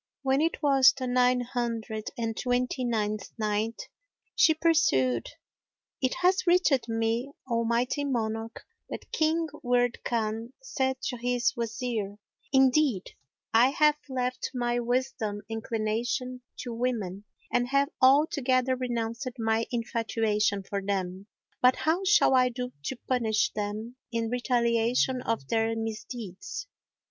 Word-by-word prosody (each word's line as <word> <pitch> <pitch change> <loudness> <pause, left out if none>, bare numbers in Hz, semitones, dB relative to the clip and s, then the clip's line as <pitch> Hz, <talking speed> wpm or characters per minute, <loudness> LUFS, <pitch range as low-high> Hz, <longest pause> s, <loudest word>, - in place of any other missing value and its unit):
When 270 +1 +2
it 325 0 -1
was 270 -2 +6
the 255 - -3
Nine 250 0 +3
Hundred 230 -3 -3
and 225 -1 -2
Twenty 250 +1 -1
ninth 215 -3 -1
Night, 215 +1 -1 0.5
She 315 - +5
pursued: 305 - +2 0.7
It 260 -1 +1
hath 370 +1 +3
reached 320 -9 +3
me, 225 +4 -1 0.2
O 230 -2 +1
mighty 240 +5 0
monarch, 225 -4 -3 0.2
that - - -8
King 320 +1 +1 0.2
Wird 245 -1 +1
Khan 225 +1 -2
said 265 - -1
to 250 - -2
his 245 +2 0
Wazir, 225 -3 -3 0.3
"Indeed, 265 -5 +3 0.4
I 235 +3 +6
have 300 +1 +3
left 255 -1 -2
my 240 -1 0
whilome 240 -4 -1
inclination 225 +3 -2 0.2
to 240 - -5
women 215 -5 -2 0.3
and 245 0 +2
have 275 +2 +2
altogether 260 -2 +4
renounced 240 0 -3
my 225 0 0
infatuation 225 -4 0
for 200 +1 -3
them; 195 -1 -3 0.3
but 250 0 +6
how 330 +5 0
shall 400 -7 +5
I 255 -1 +5
do 250 +1 -5
to 265 - -3
punish 225 -4 +1
them 215 +4 -4
in 230 -1 -1
retaliation 245 +1 +1
of 225 - -2
their 225 0 +1
misdeeds? 225 - -6
240 Hz, 125 wpm, -28 LUFS, 225-260 Hz, 0.7 s, was